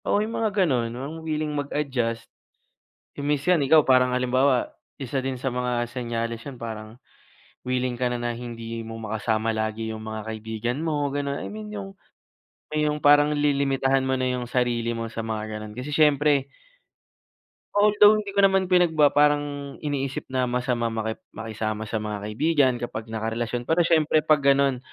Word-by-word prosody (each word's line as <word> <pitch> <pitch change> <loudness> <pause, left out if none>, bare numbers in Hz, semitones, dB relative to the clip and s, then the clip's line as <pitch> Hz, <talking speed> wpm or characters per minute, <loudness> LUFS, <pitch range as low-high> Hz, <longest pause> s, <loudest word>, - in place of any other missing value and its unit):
Oo, - - +2
yung 225 - -6
mga 220 - +2 0.2
gano'n, 125 -7 0
mga 135 +2 -5
wiling 155 -1 -2
mag-adjust. 135 -5 -2 0.9
Kung 140 - -4
minsan 150 +5 +2
ikaw, 155 +3 +6
parang 130 -2 +3
halimbawa, 125 +1 +2 0.3
isa 135 +1 -3
din 130 -1 -3
sa 135 - 0
mga 125 -1 -1
senyales 115 -2 -3
yun 130 -4 -9
parang 110 -1 -6 0.7
wiling 125 0 -1
ka 125 +1 0
na, 120 - -2
na 120 0 -2
hindi 115 -1 -6
mo 115 0 -7
makasama 110 +1 -1
lagi 110 0 -2
'yong 110 - -7
mga 110 0 -5
kaibigan 110 +2 -4
mo, 150 -3 0
gano'n. 140 0 -2
I - - -4
mean, 215 0 -7
yung 195 -1 -7 0.8
may 150 0 +1
yung 150 - -1
parang 145 0 +5
lilimitahan 140 -2 +2
mo 130 - +1
na 130 - -1
'yong 125 -1 -2
sarili 120 -2 0
mo 115 - -3
sa 115 - -4
mga 110 -1 -4
gano'n 105 0 -9
kasi 130 +4 -5
siyempre 145 -2 +3 1.3
although, 210 0 +6
hindi 205 -1 -4
ko 200 - +2
naman 190 -1 +2
pinagbaba 160 -5 +4
parang 145 -1 +1
iniisip 140 -3 -2
na 130 -1 +1
masamang 120 -2 -1
maki 110 0 -3 0.2
makisama 110 -1 -4
sa 110 +1 -2
mga 105 -1 -3
kaibigan 140 +2 +2
kapag 115 -2 -6
nakarelasyon, 115 +2 -3
pero 165 +2 +3
siyempre 155 -2 +3
'pag 155 0 +4
gano'n, 140 -1 +4
130 Hz, 165 wpm, -25 LUFS, 115-145 Hz, 1.3 s, ikaw